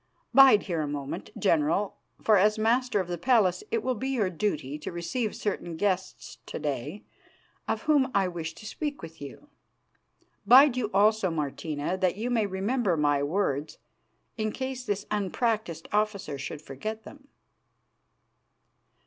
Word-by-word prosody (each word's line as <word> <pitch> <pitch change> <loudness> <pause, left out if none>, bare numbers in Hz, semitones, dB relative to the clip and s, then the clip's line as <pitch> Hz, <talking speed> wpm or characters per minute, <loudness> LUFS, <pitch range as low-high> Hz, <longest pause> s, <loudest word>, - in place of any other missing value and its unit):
Bide 270 -6 +8
here 170 -5 -2
a 150 - -2
moment, 145 -1 -5
General, 170 +2 +1 0.3
for 215 - +5
as 210 +3 +4
Master 230 +1 +2
of 185 - -2
the 175 -1 -4
Palace 220 - +3
it 455 -1 -1
will 255 - +1
be 260 +3 -4
your 220 -8 0
duty 155 -6 -2
to - - -6
receive 180 +7 -3
certain 175 -5 -3
guests 190 0 -2
to - - -5
day 145 - -4 0.6
of - - -2
whom 295 -4 +3
I 195 -2 +3
wish 165 -2 -5
to - - -12
speak 290 - -4
with 165 -1 -10
you. 145 - -10 1.0
Bide 270 +1 +7
you 240 -5 -1
also, 205 0 +3
Martina, 150 +1 -3
that 185 0 +1
you 235 +4 -2
may 225 -4 +2
remember 195 0 0
my 145 -1 +2
words 150 -2 -1 0.6
in 215 0 0
case 260 0 -4
this 205 -4 -2
unpractised 210 -3 -1
officer 205 -9 -1
should 145 +2 -6
forget 215 +12 -6
them." 280 +3 -14
200 Hz, 150 wpm, -27 LUFS, 160-230 Hz, 1.0 s, Bide